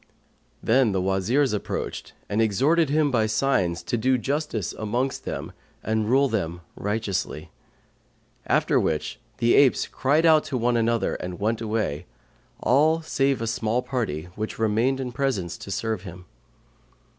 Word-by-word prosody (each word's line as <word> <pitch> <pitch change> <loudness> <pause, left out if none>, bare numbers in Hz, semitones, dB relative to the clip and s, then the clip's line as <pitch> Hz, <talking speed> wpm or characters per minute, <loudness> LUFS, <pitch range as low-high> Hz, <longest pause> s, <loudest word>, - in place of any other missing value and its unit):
Then 120 -2 +3
the 95 - +1
Wazirs 95 +9 +1
approached 105 - -4
and 105 +2 0
exhorted 140 - +2
him 150 0 +2
by 110 -3 +2
signs 110 -7 +1
to 120 - -1
do 130 +3 +2
justice 135 - -2
amongst 120 +5 -2
them - - -5 0.3
and 110 0 0
rule 135 +3 +4
them 85 -8 -2
righteously; 105 -2 -3 1.0
after - - +3
which 75 -1 -2 0.2
the 120 0 +3
apes 140 -3 +4
cried 150 +5 +1
out 155 -2 +6
to 140 -4 -2
one 120 0 +1
another 115 0 +1
and 90 0 -6
went 110 +2 0
away, 110 -9 -2 0.5
all 155 +5 +3
save 135 -5 0
a - - -1
small 115 +2 -1
party 110 - -2
which 110 +1 -4
remained 115 +5 +1
in 130 -2 -3
presence 115 -10 -1
to - - -9
serve 110 +1 -2
him. 95 -1 -10
115 Hz, 145 wpm, -25 LUFS, 105-135 Hz, 1.0 s, out